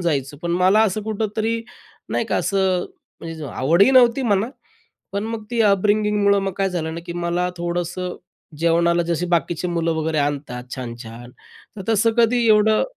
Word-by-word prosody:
जायचो. 145 -5 -1
पण 170 - -2
मला 185 +5 +4
असं 215 0 0
कुठेतरी 220 +1 -2 0.5
नाही - - -1
का - - -1
असं 190 -2 +1 0.4
म्हणजे 165 -2 -7
आवडही 165 - +3
नव्हती 255 0 +5
म्हणा, 210 -1 +1 0.6
पण 200 +2 -2
मग 225 -1 -5
ती 235 -1 0
अपब्रिंगिंग 210 +1 +2
मुळं 200 0 +4
मग 195 -1 -2
काय 195 0 +2
झालं 160 -2 -3
ना, 165 - -5
की 170 - -5
मला 175 +1 -1
थोडंसं 175 +1 -3 0.4
जेवणाला 170 +1 +2
जसे 170 +1 -1
बाकीचे 175 0 0
मुलं 165 -1 0
वगैरे 160 -1 -1
आणतात 140 -4 -2
छान-छान 120 -1 -8 0.5
तर 195 - -6
तसं 225 +1 +3
कधी 235 0 +3
एवढं 215 0 +4
180 Hz, 160 wpm, -21 LUFS, 165-210 Hz, 0.6 s, नव्हती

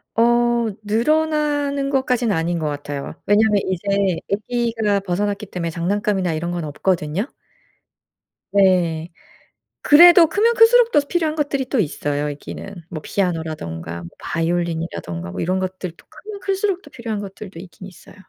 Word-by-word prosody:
어 240 0 +3
늘어나는 290 +4 +1
것까지는 250 -5 +1
아닌 165 +1 -1
것 155 - -2
같아요. 145 -1 -5
왜냐하면 210 0 +3
이제 195 0 0 0.2
아기가 225 -1 0
벗어났기 200 +2 -2
때문에 175 -3 -4
장난감이나 185 +1 -1
이런 170 +2 -3
건 175 -1 -3
없거든요. 170 - -1 1.2
네. 175 -4 +2 0.7
그래도 335 +2 +8
크면 455 +5 +2
클수록 470 0 +6
또 295 - +5
필요한 315 +1 -1
것들이 280 -3 -1
또 265 - 0
있어요 145 -4 -2
있기는. 170 +5 -8
뭐 155 - -5
피아노라든가 155 - -3
뭐 85 - -8
바이올린이라든가 165 - -3
뭐 - - -5
이런 185 +2 0
것들도 185 -2 -5
크면 415 -2 -10
클수록 390 -1 -1
또 290 - -15
필요한 225 -5 -4
것들도 195 -2 -9
있긴 185 +1 -12
있어요. 185 - -14
200 Hz, 345 characters per minute, -21 LUFS, 170-265 Hz, 1.2 s, 그래도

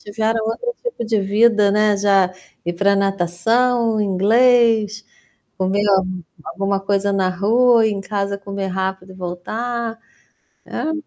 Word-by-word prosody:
tiveram 220 +1 -2
outro 485 - -3
tipo 480 - -4
de 220 -1 +1
vida, 210 +1 +3
né. 210 0 +2
Já 195 -2 +3 0.3
ir 175 - -2
pra 200 +3 +2
natação, 215 +5 +1
inglês, 220 +2 +2 0.5
comer 190 +2 0
al 190 -1 +3 0.4
alguma 195 0 -2
coisa 200 0 0
na 190 -1 +1
rua, 225 +5 +3
em 205 -2 -2
casa 200 0 -3
comer 195 -1 -5
rápido 190 0 -4
e - - -15
voltar 225 +6 -4 0.7
hã? 315 - -3
205 Hz, 130 wpm, -19 LUFS, 195-225 Hz, 0.7 s, vida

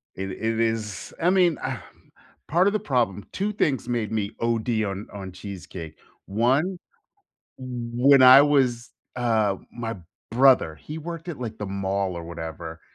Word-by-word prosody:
It 95 0 -4
it 110 +3 -2
is 110 -4 -2
I 175 - +4
mean, 180 -4 +3
um, - - -3 0.7
part 175 +5 +3
of 205 - +2
the 215 - +1
problem 120 - 0
2 200 +2 -1
things 145 -9 0
made 120 -3 -1
me 105 -1 -1
OD 115 -1 0
on 100 0 -4
on 95 -2 -7
cheesecake. 90 -4 -9 0.3
1, 130 - +1 0.8
when 125 +2 +3
I 130 +2 +10
was, 130 -5 +2 0.3
uh 110 -5 +1 0.2
my 115 -2 -4 0.3
brother, 125 - +4
he 155 - -8
worked 165 +1 -7
at, 155 - -5
like, 115 -3 -5
the 105 - -4
mall 95 -1 -2
or 85 - -6
whatever, 80 -1 -7
115 Hz, 155 wpm, -25 LUFS, 100-135 Hz, 0.8 s, I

